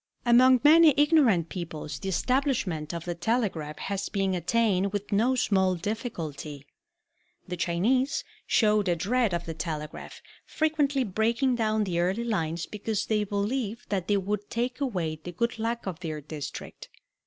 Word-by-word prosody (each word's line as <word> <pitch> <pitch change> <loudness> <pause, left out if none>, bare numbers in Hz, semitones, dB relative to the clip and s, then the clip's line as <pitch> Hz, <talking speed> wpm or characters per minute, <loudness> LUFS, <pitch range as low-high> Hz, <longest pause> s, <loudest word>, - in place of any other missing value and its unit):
Among 250 +1 +6
many 310 -1 +7
ignorant 275 - +4
peoples 160 -4 -6
the 195 - -4
establishment 210 - 0
of 170 -1 -5
the 175 - -2
telegraph 170 -5 -1
has 200 0 -3
been 195 -2 0
attained 195 +1 +1
with 205 0 -4
no 230 +6 +3
small 190 -6 +2
difficulty. 165 - -5 0.8
The 180 - -3
Chinese 225 - +1 0.2
showed 210 -2 +3
a 175 - +2
dread 220 +6 +1
of 170 0 -2
the 165 - -4
telegraph, 155 -1 -6 0.2
frequently 290 -4 +1
breaking 230 +5 +1
down 220 -2 +1
the 175 -4 -1
early 190 +6 0
lines 170 -7 -1
because 210 0 -3
they 215 -1 +1
believed 210 +3 -3
that 190 -3 -1
they 205 - +3
would 205 +1 -3
take 245 +3 -2
away 175 - -2
the 175 - -6
good 235 +6 -1
luck 230 +1 -2
of 180 -4 -4
their 160 -4 -4
district. 150 0 -8
205 Hz, 155 wpm, -27 LUFS, 170-235 Hz, 0.8 s, many